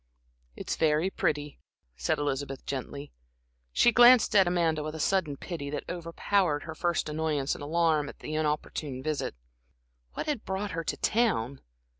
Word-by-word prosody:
"It's -, -, -4 dB
very 160 Hz, +3 st, +2 dB
pretty," 150 Hz, -4 st, -2 dB, 0.4 s
said 60 Hz, -, 0 dB
Elizabeth, 140 Hz, -2 st, -3 dB
gently. 140 Hz, +1 st, -5 dB, 0.6 s
She 240 Hz, -, +5 dB
glanced 240 Hz, -1 st, +7 dB
at 195 Hz, -3 st, +6 dB
Amanda 165 Hz, -3 st, +1 dB
with 155 Hz, +1 st, -5 dB
a -, -, -6 dB
sudden 160 Hz, -4 st, +1 dB
pity 145 Hz, -4 st, -6 dB
that 150 Hz, -, -4 dB
overpowered 170 Hz, -2 st, 0 dB
her 160 Hz, -, -6 dB
first 170 Hz, +1 st, -1 dB
annoyance 150 Hz, -2 st, -1 dB
and -, -, -7 dB
alarm 155 Hz, -1 st, +1 dB
at -, -, -11 dB
the 155 Hz, -, -7 dB
inopportune 150 Hz, -3 st, -2 dB
visit. 155 Hz, -1 st, -2 dB, 0.8 s
What -, -, -4 dB
had 295 Hz, -7 st, -2 dB
brought 190 Hz, +1 st, -3 dB
her 165 Hz, 0 st, -3 dB
to -, -, -3 dB
town? 165 Hz, -, 0 dB
155 Hz, 155 wpm, -28 LUFS, 145-175 Hz, 0.8 s, glanced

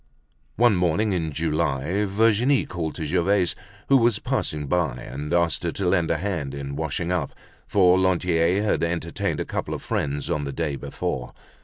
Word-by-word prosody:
One 120 Hz, -3 st, +4 dB
morning 90 Hz, +5 st, +1 dB
in 80 Hz, -4 st, -1 dB
July 75 Hz, +4 st, 0 dB
Virginie 115 Hz, +6 st, +3 dB
called 80 Hz, -3 st, -4 dB
to 80 Hz, -, -4 dB
Gervaise, 90 Hz, +3 st, +2 dB, 0.3 s
who 135 Hz, -, +6 dB
was 120 Hz, -3 st, +3 dB
passing 75 Hz, -1 st, -2 dB
by, 80 Hz, -4 st, 0 dB
and 65 Hz, +5 st, -6 dB
asked 85 Hz, -1 st, +1 dB
her 85 Hz, -, 0 dB
to 95 Hz, -, -2 dB
lend 90 Hz, -2 st, +2 dB
a -, -, +2 dB
hand 80 Hz, -7 st, -3 dB
in 70 Hz, 0 st, -5 dB
washing 80 Hz, +3 st, -2 dB
up, 85 Hz, -6 st, -2 dB, 0.3 s
for 95 Hz, -2 st, +4 dB
Lantier 90 Hz, 0 st, +2 dB
had 105 Hz, -, +1 dB
entertained 85 Hz, 0 st, -2 dB
a -, -, -2 dB
couple -, -, -3 dB
of -, -, -8 dB
friends 70 Hz, 0 st, -2 dB
on 75 Hz, -, -1 dB
the 70 Hz, -, -3 dB
day 75 Hz, 0 st, -2 dB
before. 65 Hz, -2 st, -4 dB
85 Hz, 175 wpm, -24 LUFS, 75-95 Hz, 0.3 s, who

